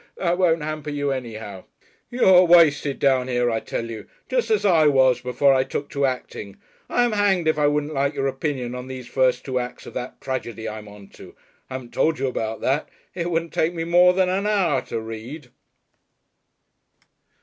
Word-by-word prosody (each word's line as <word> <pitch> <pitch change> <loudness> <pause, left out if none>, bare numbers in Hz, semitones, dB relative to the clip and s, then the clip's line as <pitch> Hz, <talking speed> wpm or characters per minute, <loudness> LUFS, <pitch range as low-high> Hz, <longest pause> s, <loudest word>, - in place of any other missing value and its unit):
That 175 -1 0
won't 165 -4 +2
hamper 155 -1 -5
you 145 -1 -2
anyhow. 110 -7 -6 0.4
You're 190 -7 +5
wasted 150 -5 +4
down 130 -2 +2
here, 120 -1 0
I 115 - 0
tell 115 - -5
you. 110 - -8 0.2
Just - - 0
as 435 - +1
I 165 -6 +5
was, 130 -3 +3
before 125 +2 +2
I 130 -1 +3
took 140 +2 -5
to 140 -1 +1
acting. 115 -6 -6 0.3
I'm 245 -1 +2
hanged 200 -5 +1
if 155 -1 +2
I 145 - +3
wouldn't 150 +1 -1
like 140 +1 0
your 135 - -1
opinion 135 -3 -3
on 125 0 -7
these 130 -1 -7
first 130 0 +1
two 130 -2 -1
acts 125 0 -7
of - - -10
that 125 0 -6
tragedy 120 -4 -5
I'm 105 -1 -7
on 100 -1 -13
to. - - -14 0.3
I 130 - -6
haven't 125 -2 -8
told 160 -1 +1
you 135 - -2
about 115 -4 -3
that. 140 +3 0 0.2
It 175 -1 -3
wouldn't 165 -1 -2
take 170 +2 0
me 165 - -2
more 175 +2 +5
than 185 0 +2
an 195 +3 -1
hour 185 -10 +1
to 115 - -3
read...." 115 +5 -8
140 Hz, 195 wpm, -23 LUFS, 125-165 Hz, 0.4 s, You're